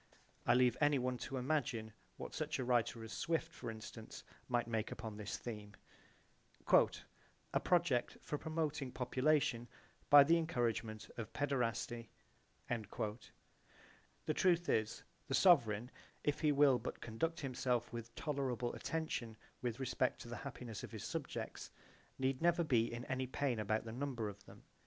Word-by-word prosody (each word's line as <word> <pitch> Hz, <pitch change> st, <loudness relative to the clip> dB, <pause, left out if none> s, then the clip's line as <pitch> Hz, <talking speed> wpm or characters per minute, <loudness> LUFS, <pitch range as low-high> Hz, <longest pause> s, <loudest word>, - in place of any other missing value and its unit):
(I 120 Hz, -, +6 dB
leave 125 Hz, -1 st, +5 dB
anyone 130 Hz, -4 st, +2 dB
to 135 Hz, -, -4 dB
imagine 125 Hz, -5 st, -1 dB, 0.2 s
what -, -, -6 dB
such -, -, -2 dB
a -, -, -1 dB
writer 120 Hz, -2 st, +1 dB
as 110 Hz, -, -7 dB
Swift, 165 Hz, -1 st, -1 dB
for -, -, -6 dB
instance, 110 Hz, -1 st, -8 dB, 0.2 s
might 120 Hz, -1 st, +1 dB
make 115 Hz, -2 st, -1 dB
upon 110 Hz, -2 st, -5 dB
this 105 Hz, -2 st, -4 dB
theme, 105 Hz, -3 st, -7 dB, 1.8 s
"A -, -, +4 dB
project 170 Hz, -9 st, +2 dB
for 150 Hz, -, -4 dB
promoting 155 Hz, -4 st, -2 dB
population 130 Hz, -1 st, +1 dB, 0.4 s
by 145 Hz, -1 st, +11 dB
the 165 Hz, +4 st, +5 dB
encouragement 115 Hz, -8 st, -1 dB
of 115 Hz, -2 st, -5 dB
paederasty." 120 Hz, -4 st, -1 dB, 0.6 s
J.B.) 110 Hz, -1 st, -3 dB, 1.1 s
The 155 Hz, -, +1 dB
truth 175 Hz, 0 st, +3 dB
is, 110 Hz, 0 st, +1 dB, 0.2 s
the 135 Hz, -, +1 dB
sovereign, 125 Hz, -, +5 dB, 0.3 s
if 145 Hz, -, +1 dB
he 150 Hz, -, +3 dB
will 140 Hz, -3 st, +5 dB
but -, -, -5 dB
conduct 140 Hz, +9 st, -2 dB
himself 125 Hz, -3 st, -1 dB
with 120 Hz, 0 st, -6 dB
tolerable 130 Hz, -5 st, -1 dB
attention 125 Hz, -9 st, -3 dB, 0.2 s
with 120 Hz, 0 st, -2 dB
respect 130 Hz, -1 st, 0 dB
to -, -, -8 dB
the 120 Hz, -, -4 dB
happiness 125 Hz, -6 st, -6 dB
of -, -, -7 dB
his -, -, -6 dB
subjects -, -, -4 dB, 0.5 s
need 130 Hz, +1 st, 0 dB
never 170 Hz, 0 st, +4 dB
be 120 Hz, -7 st, +2 dB
in 120 Hz, +1 st, -5 dB
any 130 Hz, 0 st, -1 dB
pain 130 Hz, -2 st, 0 dB
about 110 Hz, +1 st, 0 dB
the 110 Hz, -, -5 dB
number 125 Hz, -3 st, -2 dB
of 100 Hz, 0 st, -11 dB
them. -, -, -14 dB
125 Hz, 150 wpm, -37 LUFS, 115-145 Hz, 1.8 s, by